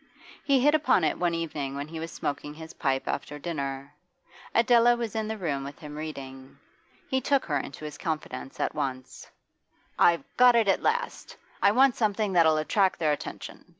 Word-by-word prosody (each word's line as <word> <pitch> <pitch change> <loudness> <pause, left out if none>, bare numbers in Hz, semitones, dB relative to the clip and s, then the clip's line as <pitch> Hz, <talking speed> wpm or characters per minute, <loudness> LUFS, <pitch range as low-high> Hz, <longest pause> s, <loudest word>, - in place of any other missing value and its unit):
He 275 -2 +3
hit 295 +3 +4
upon 270 - +3
it 155 - 0
one 175 -1 +1
evening 150 -5 -4
when 140 +1 -4
he 160 +1 -7
was 165 +1 -5
smoking 145 +1 -4
his 160 +1 -10
pipe 135 -1 -1
after 145 - -3
dinner. 140 -3 -5 0.6
Adela 240 +1 +5
was 230 -2 -4
in 220 -1 -1
the 220 0 -4
room 145 -8 -2
with 140 +1 -8
him 150 -1 -9
reading. 135 -4 -8 0.5
He 265 0 0
took 275 +1 +1
her 145 -3 0
into 140 +3 -8
his 150 -1 -8
confidence 155 -5 -5
at - - -1
once. 130 -3 -5 0.7
'I've 170 -4 +4
got 250 -1 +7
it 230 -3 +3
at 195 - +2
last! 475 +2 -2 0.2
I 200 - +6
want 260 +3 +4
something 210 -2 0
that'll 160 -3 +5
attract 190 +5 +1
their 155 -3 +1
attention. 145 - -6
165 Hz, 185 wpm, -27 LUFS, 145-220 Hz, 0.7 s, got